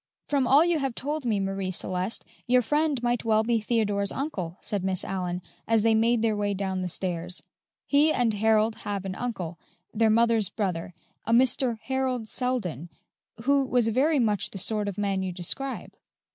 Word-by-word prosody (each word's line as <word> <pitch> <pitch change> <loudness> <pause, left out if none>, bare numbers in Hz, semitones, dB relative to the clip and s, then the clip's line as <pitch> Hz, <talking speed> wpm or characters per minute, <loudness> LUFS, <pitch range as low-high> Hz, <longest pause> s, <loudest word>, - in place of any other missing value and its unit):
"From 275 -3 +1
all 285 +6 +6
you 345 -2 +2
have 270 -4 -2
told 295 0 -3
me, 215 -4 +1
Marie 195 -1 -2
Celeste, 185 +3 -2 0.2
your 250 0 +4
friend 295 0 0
might 240 0 +1
well 220 -1 +3
be 230 0 +1
Theodore's 210 -3 0
uncle," 195 - -4
said 200 -3 -2
Miss 190 0 +1
Allyn, 180 -2 -3 0.2
as 225 -2 +3
they 225 0 +4
made 230 +1 +3
their 220 -2 +2
way 205 -1 -1
down 190 -1 -2
the 180 - -2
stairs; 180 0 -3 0.4
"he 295 +2 +4
and 240 -6 +1
Harold 220 +1 +2
have 200 -2 -4
an 190 - -3
uncle 185 -8 -4 0.3
their 225 0 +3
mother's 225 -2 +3
brother 180 -4 -3 0.3
a - - 0
Mr. 245 0 +3
Harold 260 -3 -1
Selden, 200 - -2 0.5
who 280 +2 +3
was 245 -3 +2
very 285 +7 +2
much 215 -6 +1
the - - -8
sort 210 +2 -1
of 200 - -4
man 200 -2 0
you 190 -1 -2
describe." 190 +10 -2
220 Hz, 180 wpm, -27 LUFS, 195-250 Hz, 0.5 s, all